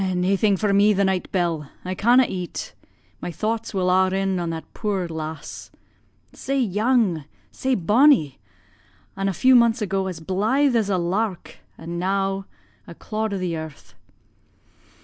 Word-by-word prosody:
"Naething 195 +3 +2
for 205 +1 +1
me 205 +2 +5
the 200 0 +2
night, 190 -1 -1
Bell 165 -6 -1 0.2
I 185 - -2
canna' 240 +7 +4
eat 180 -3 -5 0.5
my 175 - -4
thoughts 220 +6 -3
will 185 -2 0
a' 185 0 +4
rin 190 -1 -1
on 170 -1 -2
that 165 -1 -7
puir 195 -4 -2
lass. 160 -2 -7 0.6
Sae 275 0 -2
young 215 - +1 0.3
sae 260 0 -1
bonnie, 210 - +3 0.8
an' 195 0 -1
a - - 0
few 260 +8 +4
months 235 -1 +5
ago 195 -2 -1
as 180 -4 -5
blythe 220 - +1
as 220 -3 +1
a 190 - +1
lark, 185 +2 -2 0.2
an' 170 +1 -6
now 195 +1 -1 0.4
a 170 - -10
clod 215 +3 -3
o' 200 - -2
the 180 -3 -2
earth. 160 -2 -9
195 Hz, 155 wpm, -23 LUFS, 175-220 Hz, 0.8 s, me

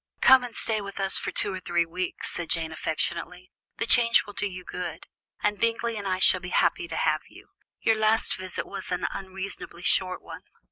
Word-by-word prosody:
"Come 260 -1 +7
and 245 -2 -7
stay 220 -2 +3
with 200 0 -8
us 195 0 +2
for - - -4
two 200 - -1
or 185 - -4
three 175 -1 0
weeks," 180 +2 -4
said 170 -2 -5
Jane 160 -1 0
affectionately. 170 +3 -3 0.3
"The - - -1
change 235 0 +5
will 205 - -10
do 205 - -1
you 185 -1 -8
good, 180 0 -6 0.4
and 210 0 +1
Bingley 230 0 0
and 205 -2 -4
I 185 -1 0
shall 185 0 +6
be 180 - -6
happy 350 - +1
to - - -6
have - - +1
you; - - -16 0.3
your 225 - +3
last 215 +1 +2
visit 185 -1 -5
was - - -7
an 180 - -1
unreasonably 190 -2 -5
short 185 0 +2
one." - - -9
190 Hz, 205 wpm, -26 LUFS, 180-220 Hz, 0.4 s, Come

